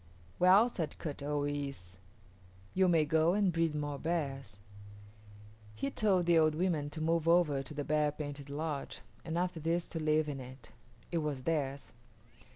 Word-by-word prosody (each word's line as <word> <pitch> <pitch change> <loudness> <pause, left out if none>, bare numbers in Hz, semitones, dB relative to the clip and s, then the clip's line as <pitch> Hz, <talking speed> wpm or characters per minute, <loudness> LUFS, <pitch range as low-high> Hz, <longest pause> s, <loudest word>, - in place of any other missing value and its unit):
"Well," 190 +6 +6
said 170 -10 -4
Kut 145 -3 -6
o 145 +1 -1
yis´, 140 -11 -4 0.8
"you 190 0 +3
may 165 -3 +4
go 160 +3 +3
and 200 -4 +2
breed 165 -2 +1
more 145 -1 -3
bears." 135 - -3 1.2
He 135 +6 -2
told 190 -5 +2
the 170 -1 +5
old 155 -1 +3
women 160 -4 0
to 155 +2 -7
move 165 0 +1
over 165 -5 +4
to 135 +3 -8
the 145 - -2
bear 150 0 +1
painted 145 -1 -7
lodge 150 0 -4 0.2
and 165 0 -3
after 180 -1 -1
this 165 +2 -1
to 165 - -4
live 155 0 +2
in 140 -2 -4
it. 130 -2 -11 0.4
It 170 - +1
was 145 -4 -3
theirs. 140 -3 -2
155 Hz, 165 wpm, -33 LUFS, 145-170 Hz, 1.2 s, Well